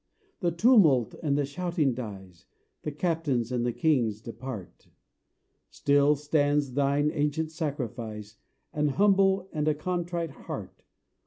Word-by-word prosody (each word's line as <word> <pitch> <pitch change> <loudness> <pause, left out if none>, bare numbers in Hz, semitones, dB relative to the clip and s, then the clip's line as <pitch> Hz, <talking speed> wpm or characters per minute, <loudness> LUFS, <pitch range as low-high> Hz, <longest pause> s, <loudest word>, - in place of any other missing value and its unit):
The 175 - +1
tumult 170 - +4
and 145 -3 +1
the 145 - +1
shouting 160 -2 -1
dies; 95 -7 -9 0.3
The 150 - -4
captains 145 -6 -1
and 125 -1 0
the 120 - +1
kings 120 -8 +1
depart: 115 -3 -8 0.8
Still 145 +1 +3
stands 145 -2 +1
Thine 140 +2 +2
ancient 155 +1 -1
sacrifice, 120 - -5 0.4
An 150 0 +1
humble 195 +3 +3
and 150 -1 -1
a 155 - +3
contrite 175 0 -3
heart. - - -8
145 Hz, 120 wpm, -28 LUFS, 125-165 Hz, 0.8 s, tumult